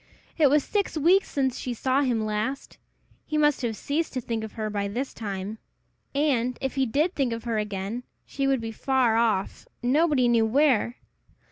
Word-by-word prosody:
It 300 -4 +5
was 290 +1 +3
six 405 -5 -1
weeks 360 +6 +4
since 265 -3 -1
she 245 -2 -4
saw 260 +4 +1
him 240 -5 0
last! 215 +6 -3 0.4
He 305 - -2
must 295 -2 +3
have 235 -3 -1
ceased 310 +8 -2
to 260 - -1
think 230 -2 -3
of 220 - -7
her 215 -2 -3
by 205 -1 -2
this 245 +7 -3
time! 200 0 -5 0.6
And, 255 -4 +1
if 265 -1 -2
he 265 -1 +1
did 305 +10 +1
think 265 -4 0
of 230 0 -5
her 230 -2 -1
again, 210 +2 -3 0.2
she 275 0 -2
would 270 -3 +2
be 225 0 -4
far 250 0 +1
off, 225 -4 0 0.2
nobody 280 0 +3
knew 230 -2 +3
where. 250 -2 +2
250 Hz, 190 wpm, -26 LUFS, 220-280 Hz, 0.6 s, It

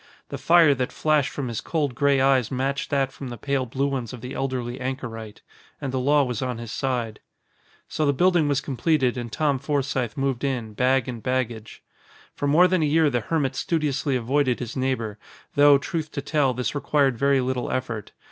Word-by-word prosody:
The - - -5
fire 165 -3 +5
that 130 -2 -2
flashed 155 -3 +1
from 140 -3 -4
his 115 -2 -4
cold 150 -5 -1
gray 140 +2 +2
eyes 130 -3 +3
matched 135 +2 -2
that 135 -2 +1
from 135 - -8
the 120 -1 -7
pale 135 +2 -1
blue 135 +4 -1
ones 135 -4 -3
of 125 - -9
the 125 - -7
elderly 125 -2 -3
anchorite. 115 -5 -6 0.4
And 135 -2 -4
the 130 - 0
law 145 +3 +3
was 125 -4 -3
on 125 -2 -2
his 115 -1 -7
side. 120 -5 -2 0.7
So 155 - -1
the - - +4
building 175 +1 +3
was 145 -1 +1
completed 135 -1 +1
and 120 -2 -5
Tom 145 +1 0
Forsythe 135 -5 -2
moved 135 -2 -1
in, 125 -6 -2
bag 130 +2 +2
and 120 -3 -5
baggage. 120 -3 -3 0.5
For 145 - -2
more 165 +6 +6
than 185 -2 +1
a - - +3
year 155 0 +3
the 120 - +1
hermit 140 0 -1
studiously 145 -4 -1
avoided 130 +1 +1
his 120 -2 -6
neighbor, 125 -5 -2 0.3
though, 145 0 +6
truth 155 +2 -4
to 140 - -3
tell, 140 -4 +1
this 125 0 -2
required 140 -2 +1
very 140 +3 +2
little 125 -1 -2
effort. 115 -5 -3
135 Hz, 195 wpm, -24 LUFS, 125-145 Hz, 0.7 s, more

